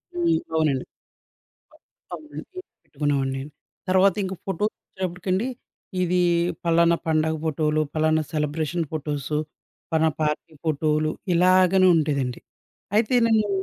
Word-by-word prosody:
హ్మ్. 340 -1 +2 0.2
అవునండి. 145 -5 +1 1.3
అ - - -2
అవునండి 305 0 -10 0.4
పెట్టుకునేవాడిని. 135 -2 -1 0.5
తర్వాతింక 190 +1 +3
ఫోటోస్ 200 +3 -1
వచ్చేటప్పటికండి 185 +3 -3 0.6
ఇది 180 0 +1 0.5
ఫలానా 170 0 +4
పండగ 160 0 +2
ఫోటోలు, 155 0 +1
పలానా 155 0 +2
సెలబ్రేషన్ 155 +2 -1
ఫోటోస్, 145 -2 -3 0.6
పలానా 160 0 +3
పార్టీ 150 +1 -2
ఫోటోలు 155 0 +1 0.2
ఇలాగనే 185 +1 +5
ఉండేదండి. 140 -6 0 0.6
అయితే 220 +3 +2
నేను 220 -2 +3
160 Hz, 95 wpm, -24 LUFS, 150-185 Hz, 1.3 s, ఇలాగనే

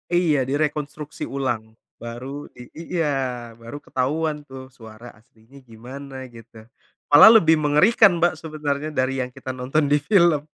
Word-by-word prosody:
Iya, 175 -4 +2
direkonstruksi 150 +1 -3
ulang. 120 -5 -4 0.2
Baru 130 +5 -8
di 125 - -11
i 170 +2 -7
iya 130 -6 -2
baru 115 +5 -8
ketahuan 150 +4 -2
tuh 130 0 -11
suara 115 0 -13
aslinya 110 +4 -22
gimana, 130 +3 -10
gitu. 115 -1 -15 0.5
Malah 145 +9 +10
lebih 160 -6 +4
mengerikan, 175 +6 +4
Mbak, 170 +1 +2
sebenarnya 150 -2 -4
dari 130 0 -1
yang 125 - -4
kita 130 -1 -6
nonton 130 +4 -1
di 145 - +4
film, 170 -3 +3
140 Hz, 140 wpm, -22 LUFS, 125-155 Hz, 0.5 s, Malah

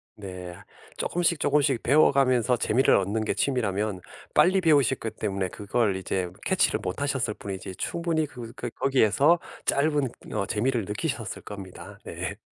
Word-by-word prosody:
네. 90 -3 -8 0.4
쪼끔씩, 170 -2 0
쪼끔씩 140 -4 +2
배워가면서 130 -3 +4
재미를 125 +5 +3
얻는 100 +3 0
게 - - 0
취미라면 105 -7 -1 0.3
빨리 190 +1 +4
배우셨기 140 -8 +2
때문에 100 -3 -2
그걸 100 0 0
이제 95 -1 -2 0.2
catch를 - - +2
못 90 +10 -4
하셨을 130 -6 0
뿐이지 95 -1 -7
충분히 165 -2 -1
그 125 -5 -9
그 120 - -4
거기에서 135 +5 +3 0.3
짧은 145 -2 +2 0.2
어 - - 0
재미를 115 -1 0
느끼셨을 110 - -3
겁니다. 100 0 -9
네. 90 +4 -5
115 Hz, 340 characters per minute, -26 LUFS, 100-140 Hz, 0.4 s, 배워가면서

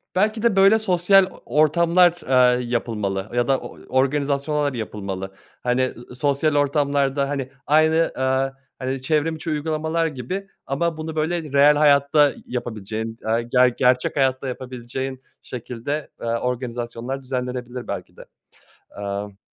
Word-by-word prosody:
belki 215 +3 +1
de 235 -4 +3
böyle 195 +3 +6
sosyal 195 -1 +4
o - - -16
ortamlar, 170 +3 +3
aaa, 125 -1 +5
yapılmalı 110 -5 -2
ya 120 +1 +1
da 135 -1 +2
o - - -10 0.2
organizasyonlar 140 +1 0
yapılmalı. 95 -4 -5 0.3
Hani, 125 +1 +2
ı 130 - -2 0.2
ı - - -9
sosyal 145 +2 +1
ortamlarda, 140 -1 +1
hani, 135 -2 -3 0.2
aynı, 160 +2 +4
aaa, 130 +1 +1 0.3
hani, 130 0 -3
çevrim 155 +3 0
içi 160 +1 -6
uygulamalar 160 +2 -1
gibi 160 +8 -5 0.2
ama 160 +4 -1
bunu 160 0 -5
böyle 160 +2 0
reel 140 +1 +6
hayatta 145 0 +4
yapabileceğin, 110 -2 -5
aaa, 115 +1 +1
ge 125 +1 +3
gerçek 125 0 +2
hayatta 135 -1 +1
yapabileceğin 130 +1 -5 0.2
şekilde, 125 +5 -5
aaa, 115 0 -1
organizasyonlar 125 +1 -4
düzenlenebilir 125 -1 -4
belki - - -6
de. - - -11 0.7
Eee 100 0 -5
135 Hz, 135 wpm, -22 LUFS, 125-155 Hz, 0.7 s, böyle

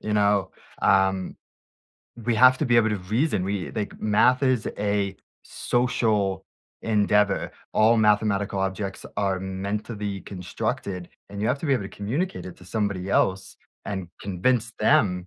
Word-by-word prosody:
you 105 - -3
know? 100 -1 +2 0.3
Um, 95 -1 +2 0.9
we 120 0 +1
have 130 +3 +6
to 155 - 0
be 120 - +2
able 115 -1 +5
to 105 - 0
reason, 105 - 0
we 100 -2 -3
like, 105 -3 -5
math 120 +5 +3
is 130 -5 +2
a 100 -1 0 0.3
social 110 -6 0 0.4
endeavor. 105 -1 +2 0.2
All 115 +2 +4
mathematical 105 -2 +2
objects 95 0 -3
are 95 -2 0
meant 95 +2 -3
to 115 - -6
be 100 -2 -4
constructed, 90 0 -4 0.2
and 100 0 -7
you 105 - 0
have 125 +3 +1
to - - -3
be 140 - +2
able 120 - -1
to - - -6
communicate 140 - -3
it 90 - -9
to 90 - -16
somebody 100 -2 -2
else 95 -1 +1 0.3
and 95 -4 -4
convince 115 +5 0
them 90 -4 +3
105 Hz, 155 wpm, -25 LUFS, 95-110 Hz, 0.9 s, have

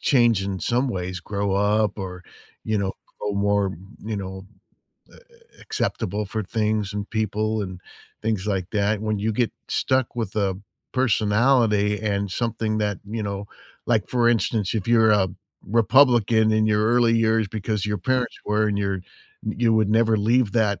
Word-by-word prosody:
change 120 -7 +3
in 95 -2 -4
some 125 +3 +1
ways, 90 -4 -3
grow 100 +2 -2
up, 105 +1 +1
or, 90 -1 -6 0.4
you 110 -1 0
know, 95 -1 -1 0.3
grow 105 - -2
more, 100 -1 +1 0.3
you 110 -1 -3
know, 95 0 -6 0.6
a - - -20
a 470 -1 -22
acceptable 105 +3 -2
for 110 +2 -3
things 105 0 -1
and 105 0 -4
people 110 0 -1
and 95 -2 -7 0.4
things 110 -4 -1
like 95 -2 -2
that. 105 0 0
When 110 -1 -2
you 110 +2 0
get 120 +1 0 0.2
stuck 130 -2 0
with 110 -4 -3
a 95 -3 0 0.3
personality 110 -3 +2
and 100 -1 -1
something 110 -1 -1
that, 105 -2 -1
you 110 0 -3
know 100 0 -4 0.4
Like, 110 -4 +1
for 120 -2 +2
instance, 115 -3 +1
if 105 -2 -2
you're 110 -2 +5
a 95 -3 +3 0.4
Republican 115 0 +4
in 110 0 +3
your 105 0 +2
early 120 0 +3
years 110 -1 +2
because 105 0 -2
your 105 -1 -1
parents 125 +3 -1
were 105 +1 +2
and 100 -1 -1
you're 100 -2 -1 0.4
y 110 - -3
you 115 -2 +3
would 110 -2 +2
never 110 0 +3
leave 110 +1 +2
that 105 -5 +1
105 Hz, 170 wpm, -23 LUFS, 100-115 Hz, 0.6 s, you're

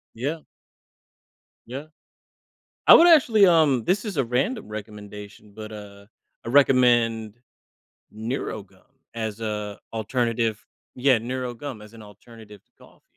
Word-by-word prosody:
Yeah. 145 +7 -4 1.2
Yeah. 135 +5 -7 1.0
I - - +10
would 340 - +8
actually, 235 - +6
um 155 -8 +3
this 190 - 0
is 205 -5 -5
a 135 - +1
random 130 - -2
recommendation, 105 0 -10
but, 110 0 -9
uh, 100 -1 -11 0.4
I - - -6
recommend 120 -5 +3 0.8
NeuroGum 110 -4 -6 0.3
as 110 -1 -5
a 105 -2 -4
alternative 115 0 -2 0.3
yeah, 130 -1 +3
"NeuroGum" 125 0 -6
as 105 - -16
an 115 - -12
alternative 105 0 -15
to - - -48
coffee. - - -21
115 Hz, 120 wpm, -24 LUFS, 105-135 Hz, 1.2 s, I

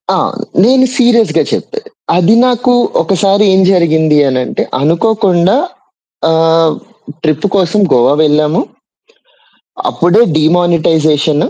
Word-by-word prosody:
ఆ! - - 0 0.5
నేను 260 +2 +3
సీరియస్‌గా 235 -3 +2
చెప్పాను. 450 0 -6 0.3
అది 185 +6 +2
నాకు 245 0 0 0.3
ఒకసారి 195 +1 0
ఏం 190 - +3
జరిగింది 160 -4 +1
అని 130 -1 -1
అంటే - - -4 0.2
అనుకోకుండా 185 - +1 0.7
ఆహ్, 160 0 +2 0.5
ట్రిప్ 155 +4 -1
కోసం 190 +3 0
గోవా 125 +3 +2
వెళ్ళాము. 150 +2 0 1.3
అప్పుడే 180 +7 +1 0.2
డీమానిటైజేషను. 155 -2 0
170 Hz, 100 wpm, -11 LUFS, 155-210 Hz, 1.3 s, నేను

